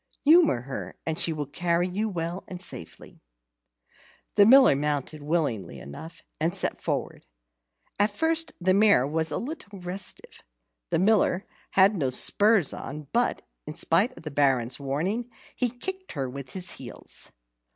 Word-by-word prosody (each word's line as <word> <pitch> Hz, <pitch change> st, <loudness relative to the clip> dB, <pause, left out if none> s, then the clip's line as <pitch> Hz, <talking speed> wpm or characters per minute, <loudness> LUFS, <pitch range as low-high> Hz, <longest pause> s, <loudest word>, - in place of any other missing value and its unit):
Humour 310 Hz, -, +5 dB
her, 135 Hz, +2 st, -7 dB
and 160 Hz, 0 st, -2 dB
she 165 Hz, -, +2 dB
will 150 Hz, -2 st, -3 dB
carry 170 Hz, +4 st, 0 dB
you 205 Hz, +4 st, -2 dB
well 175 Hz, 0 st, -4 dB
and 180 Hz, -, -7 dB
safely." 85 Hz, -, -7 dB, 1.1 s
The 205 Hz, -1 st, +6 dB
Miller 260 Hz, -, +7 dB
mounted 150 Hz, +1 st, -2 dB
willingly 145 Hz, -, -2 dB
enough, 70 Hz, -, -10 dB, 0.2 s
and 165 Hz, +4 st, 0 dB
set 190 Hz, -, 0 dB
forward. -, -, -3 dB, 0.7 s
At 205 Hz, +1 st, +4 dB
first 320 Hz, +9 st, 0 dB
the 185 Hz, +1 st, +2 dB
mare 200 Hz, -10 st, +5 dB
was 160 Hz, +3 st, -1 dB
a 150 Hz, -, -2 dB
little 240 Hz, -7 st, -7 dB
restive. 180 Hz, +2 st, -6 dB, 0.5 s
The -, -, +1 dB
Miller 195 Hz, -1 st, +2 dB, 0.3 s
had 195 Hz, +2 st, +5 dB
no 140 Hz, -8 st, 0 dB
spurs 205 Hz, -, +4 dB
on, 145 Hz, +1 st, -7 dB
but, 240 Hz, +1 st, +1 dB, 0.2 s
in 150 Hz, -, -6 dB
spite 190 Hz, +10 st, +1 dB
of -, -, -12 dB
the 155 Hz, -, -5 dB
Baron's 130 Hz, -3 st, +1 dB
warning, 175 Hz, -, -2 dB, 0.3 s
he 250 Hz, -, +1 dB
kicked 375 Hz, +11 st, -6 dB
her 135 Hz, -3 st, -2 dB
with 130 Hz, 0 st, -8 dB
his 185 Hz, -2 st, -1 dB
heels. -, -, -4 dB
175 Hz, 150 wpm, -26 LUFS, 145-210 Hz, 1.1 s, Miller